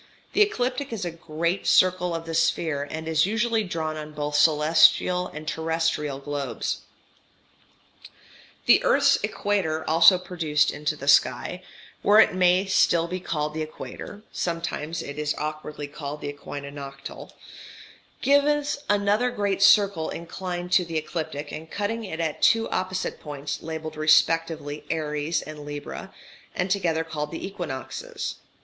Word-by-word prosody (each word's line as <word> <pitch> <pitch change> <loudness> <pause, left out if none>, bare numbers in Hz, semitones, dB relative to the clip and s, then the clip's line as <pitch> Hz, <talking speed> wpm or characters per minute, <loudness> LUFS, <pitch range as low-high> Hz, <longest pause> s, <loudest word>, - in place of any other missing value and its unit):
The - - +3
ecliptic 265 -9 +1
is 210 -5 -3
a 175 - -2
great 170 +3 -2
circle 180 -1 +3
of 165 0 -5
the 165 - -5
sphere, 160 -3 +1
and 160 +1 -5
is 160 +2 +3
usually 225 +1 +1
drawn 160 -4 -3
on 150 0 -7
both 150 0 -3
celestial 160 +4 +4
and 155 -2 -9
terrestrial 160 -3 -1
globes. 140 -1 -3 1.9
The - - +6
earth's - - +4
equator 170 -6 -1
also 165 +4 +7
produced 165 -5 0
into 150 +1 -2
the 140 -1 -9
sky, 160 +5 +3 0.4
where 210 +1 +6
it 220 - +6
may 185 +1 +3
still 170 -3 +3
be 180 +2 -4
called 150 -4 -2
the 160 - -3
equator 180 +6 -8
(sometimes 165 -2 -3
it 140 +1 -7
is 150 0 -1
awkwardly 150 -1 -5
called 145 0 -7
"the 145 - -4
equinoctial"), 140 -1 -8 0.9
gives 285 +1 +3
another 205 +4 +2
great 205 -5 -1
circle 195 -5 +5
inclined 175 +1 -5
to 180 - +5
the 165 -2 -4
ecliptic 155 -2 -4
and 160 +1 -8
cutting 225 +3 -2
it 160 -4 -6
at 160 -3 -2
two 225 0 +4
opposite 185 0 -2
points, 145 -1 -5
labelled 160 -1 -6
respectively 155 -1 +2
[Aries 155 0 -1
symbol] 155 0 -9
and 145 - -10
[Libra 145 0 -6
symbol], - - -11 0.4
and 180 +1 -1
together 170 -5 +1
called 150 -2 -4
"the 165 - -6
equinoxes." 175 -10 -5
165 Hz, 145 wpm, -25 LUFS, 150-185 Hz, 1.9 s, also